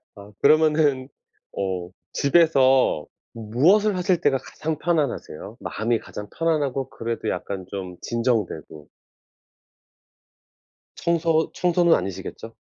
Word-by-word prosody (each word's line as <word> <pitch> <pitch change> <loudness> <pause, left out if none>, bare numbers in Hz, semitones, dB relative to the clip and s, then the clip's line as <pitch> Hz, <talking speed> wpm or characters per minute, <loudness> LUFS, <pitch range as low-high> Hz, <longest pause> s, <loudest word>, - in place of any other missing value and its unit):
아 100 0 -13
그러면은 150 -4 +3 0.5
어 95 -3 -2 0.2
집에서 135 - +3 0.3
무엇을 160 - +2
하실 180 -1 +1
때가 140 -4 +3
가장 155 +3 -5
편안하세요? 140 - -2
마음이 115 +1 -1
가장 105 0 -8
편안하고 145 -5 0
그래도 115 -2 -4
약간 95 -2 -4
좀 95 -2 -6
진정되고. 110 - -2 2.1
청소 165 -1 +1
청소는 175 -1 +2
아니시겠죠? 95 0 -5
130 Hz, 245 characters per minute, -23 LUFS, 105-160 Hz, 2.1 s, 그러면은